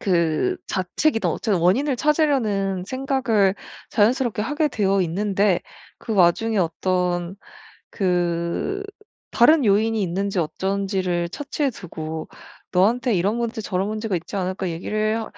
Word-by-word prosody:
그 175 Hz, -, +1 dB
자책이든 225 Hz, -, 0 dB
어쨌든 200 Hz, -6 st, 0 dB
원인을 260 Hz, -, +2 dB
찾으려는 235 Hz, -, +1 dB
생각을 255 Hz, -5 st, +1 dB, 0.4 s
자연스럽게 225 Hz, -1 st, +2 dB
하게 295 Hz, +5 st, 0 dB
되어 195 Hz, -5 st, +1 dB
있는데 195 Hz, +2 st, +1 dB, 0.4 s
그 225 Hz, -, -5 dB
와중에 200 Hz, +4 st, +3 dB
어떤 180 Hz, +1 st, -1 dB, 0.5 s
그 175 Hz, -, -1 dB, 0.5 s
다른 295 Hz, +4 st, +5 dB
요인이 220 Hz, +2 st, +2 dB
있는지 195 Hz, +1 st, -1 dB
어쩐지를 185 Hz, 0 st, -1 dB
차치해 285 Hz, -, -2 dB
두고 160 Hz, -7 st, -6 dB, 0.5 s
"너한테 230 Hz, +6 st, +2 dB
이런 195 Hz, +5 st, +1 dB
문제 235 Hz, -1 st, -2 dB
저런 190 Hz, -1 st, -1 dB
문제가 215 Hz, -3 st, -2 dB
있지 170 Hz, -, -7 dB
않을까?" 185 Hz, 0 st, -2 dB
얘기를 215 Hz, +6 st, -1 dB
200 Hz, 290 characters per minute, -22 LUFS, 180-230 Hz, 0.5 s, 다른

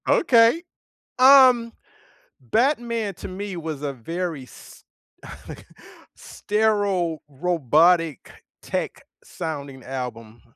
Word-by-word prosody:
Okay. 235 Hz, +7 st, +4 dB, 0.6 s
Um, 255 Hz, -3 st, +6 dB, 0.7 s
Batman 235 Hz, -4 st, -1 dB
to -, -, -9 dB
me 195 Hz, +1 st, -6 dB
was 155 Hz, -3 st, -6 dB
a 140 Hz, -1 st, -3 dB
very 165 Hz, +4 st, -5 dB
s 125 Hz, -, -16 dB, 0.7 s
okay, -, -, -10 dB, 0.5 s
sterile, 205 Hz, -6 st, -1 dB
robotic, 165 Hz, +1 st, +1 dB, 0.3 s
tech-sounding 140 Hz, -5 st, -7 dB
album. 120 Hz, -4 st, -7 dB
175 Hz, 80 wpm, -23 LUFS, 140-220 Hz, 0.7 s, Um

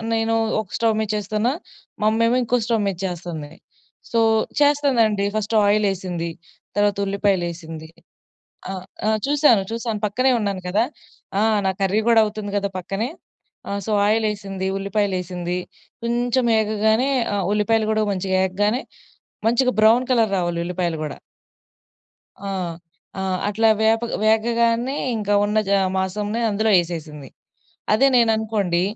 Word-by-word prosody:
నేను 225 Hz, 0 st, +1 dB, 0.3 s
ఒక 200 Hz, -, -13 dB
స్టవ్ 225 Hz, -1 st, +2 dB
మీద 215 Hz, -, -3 dB
చేస్తున్న, 210 Hz, +2 st, -1 dB, 0.5 s
మా -, -, +1 dB
అమ్మేమొ 230 Hz, +2 st, +2 dB
ఇంకో 245 Hz, +1 st, +1 dB
స్టవ్ 230 Hz, -2 st, +1 dB
మీద 195 Hz, -3 st, -2 dB
చేస్తుంది. 170 Hz, -4 st, -6 dB, 0.6 s
సో 230 Hz, -, +2 dB, 0.4 s
చేస్తదండి. 265 Hz, -9 st, +3 dB
ఫస్ట్ 215 Hz, +1 st, -2 dB
ఆయిలెసింది, 190 Hz, -5 st, 0 dB, 0.5 s
తర్వాత 205 Hz, 0 st, +2 dB
ఉల్లిపాయలెసింది. 175 Hz, -5 st, -2 dB, 0.8 s
ఆహ్, 185 Hz, -1 st, -6 dB, 0.2 s
ఆ! -, -, +3 dB, 0.2 s
చూసాను. 285 Hz, -6 st, +4 dB
చూసాను. 230 Hz, -2 st, -3 dB
పక్కనే 255 Hz, +6 st, +2 dB
ఉన్నాను 200 Hz, -3 st, -2 dB
కదా! 205 Hz, +5 st, +2 dB, 0.6 s
ఆ! -, -, +2 dB, 0.2 s
నా 190 Hz, -, +3 dB
కర్రీ 195 Hz, +2 st, +2 dB
గూడా 230 Hz, -1 st, +6 dB
అవుతుంది 210 Hz, -1 st, -5 dB
గదా 200 Hz, 0 st, -1 dB
పక్కనే. 195 Hz, +6 st, -3 dB, 0.6 s
ఆ! -, -, -3 dB
సో -, -, -3 dB, 0.2 s
ఆయిలెసింది, 205 Hz, -3 st, -1 dB
ఉల్లిపాయలెసింది, 185 Hz, -3 st, -2 dB, 0.5 s
కొంచెం 240 Hz, +1 st, +1 dB
ఎగగానే 220 Hz, +4 st, +1 dB, 0.3 s
ఆహ్, 195 Hz, -3 st, -1 dB
ఉల్లిపాయలు 215 Hz, +1 st, +1 dB
గూడా 215 Hz, 0 st, +1 dB
మంచిగా 190 Hz, 0 st, -1 dB
ఏగగానే 205 Hz, +6 st, 0 dB, 0.6 s
మంచిగా 250 Hz, +2 st, +2 dB
బ్రౌన్ 230 Hz, +4 st, +5 dB
కలర్ 225 Hz, -4 st, +3 dB
రావాలి 175 Hz, -1 st, -1 dB
ఉల్లిపాయలు 175 Hz, -2 st, -2 dB
గూడా. 150 Hz, -, -6 dB, 1.3 s
ఆ! -, -, -3 dB, 0.7 s
ఆ! -, -, -2 dB, 0.3 s
అట్లా 220 Hz, +2 st, +3 dB
వేపగ్ 225 Hz, +1 st, +2 dB
వేగగానే 230 Hz, +3 st, +2 dB, 0.2 s
ఇంకా 205 Hz, -1 st, -1 dB
ఉన్న 210 Hz, +1 st, -1 dB
జ -, -, +1 dB, 0.3 s
మాసంని 205 Hz, +4 st, -2 dB
అందులో 215 Hz, +1 st, +1 dB
ఎసేసింది. 155 Hz, -5 st, -7 dB, 0.6 s
అదే 220 Hz, +6 st, +5 dB
నేను 235 Hz, -2 st, +4 dB
అనుకోండి 205 Hz, -6 st, 0 dB
210 Hz, 130 wpm, -22 LUFS, 190-225 Hz, 1.3 s, గూడా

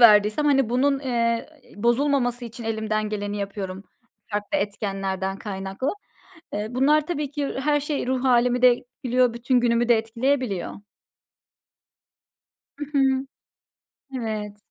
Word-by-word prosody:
verdiysem, 215 Hz, +3 st, +6 dB
hani, 270 Hz, -4 st, +4 dB
bunun, 270 Hz, +3 st, +2 dB
eee, 235 Hz, -3 st, 0 dB, 0.3 s
bozulmaması 245 Hz, +2 st, +1 dB
için 235 Hz, 0 st, -8 dB
elimden 215 Hz, -1 st, -1 dB
geleni 205 Hz, -1 st, -3 dB
yapıyorum 195 Hz, -1 st, -5 dB, 0.5 s
farklı 205 Hz, +8 st, -1 dB
etkenlerden 195 Hz, -3 st, -2 dB
kaynaklı. 195 Hz, +5 st, -3 dB, 0.6 s
Eee, 210 Hz, +1 st, -2 dB
bunlar 290 Hz, +5 st, +3 dB
tabii 300 Hz, -5 st, -2 dB
ki 290 Hz, -1 st, -2 dB
her 295 Hz, +2 st, +2 dB
şey 290 Hz, -2 st, -2 dB
ruh 260 Hz, 0 st, 0 dB
hâlimi 245 Hz, -1 st, +3 dB
de 250 Hz, 0 st, +8 dB
etkiliyor, 250 Hz, 0 st, 0 dB
bütün 245 Hz, +2 st, +2 dB
günümü 240 Hz, 0 st, +2 dB
de 235 Hz, -, +6 dB
etkileyebiliyor. 230 Hz, -2 st, -1 dB, 2.1 s
Hı 295 Hz, -, -3 dB
hı. 265 Hz, 0 st, +2 dB, 0.9 s
Evet. 215 Hz, -4 st, -4 dB
240 Hz, 120 wpm, -24 LUFS, 210-265 Hz, 2.1 s, de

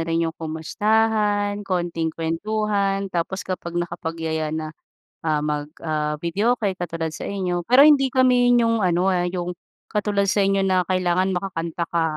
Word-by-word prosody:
rin 165 Hz, 0 st, +1 dB
'yong 165 Hz, -, -2 dB
kumustahan, 205 Hz, +5 st, 0 dB
konting 175 Hz, -4 st, -2 dB
kuwentuhan 195 Hz, +4 st, -1 dB
tapos 180 Hz, +3 st, -2 dB
kapag 175 Hz, -2 st, -5 dB
nakapagyaya 165 Hz, -2 st, -3 dB
na, 155 Hz, 0 st, -4 dB, 0.5 s
ah, 150 Hz, -1 st, +1 dB
mag 150 Hz, -1 st, -2 dB, 0.2 s
ah, 150 Hz, -1 st, -1 dB
videoke 205 Hz, +5 st, +1 dB
katulad 165 Hz, -2 st, -3 dB
sa -, -, -7 dB
inyo, 180 Hz, -3 st, -2 dB
pero 250 Hz, +4 st, +7 dB
hindi 280 Hz, -3 st, +5 dB
kami 250 Hz, -1 st, +4 dB
yung 230 Hz, 0 st, +2 dB
ano, 185 Hz, 0 st, +2 dB
ah, 180 Hz, -1 st, +1 dB
yung 180 Hz, -1 st, -4 dB, 0.3 s
katulad 205 Hz, -2 st, +1 dB
sa 205 Hz, -, 0 dB
inyo 195 Hz, 0 st, +2 dB
na 185 Hz, -2 st, +2 dB
kailangan 185 Hz, +1 st, +1 dB
makakanta 170 Hz, -3 st, -3 dB
ka, 170 Hz, -1 st, +1 dB
180 Hz, 150 wpm, -23 LUFS, 165-205 Hz, 0.5 s, pero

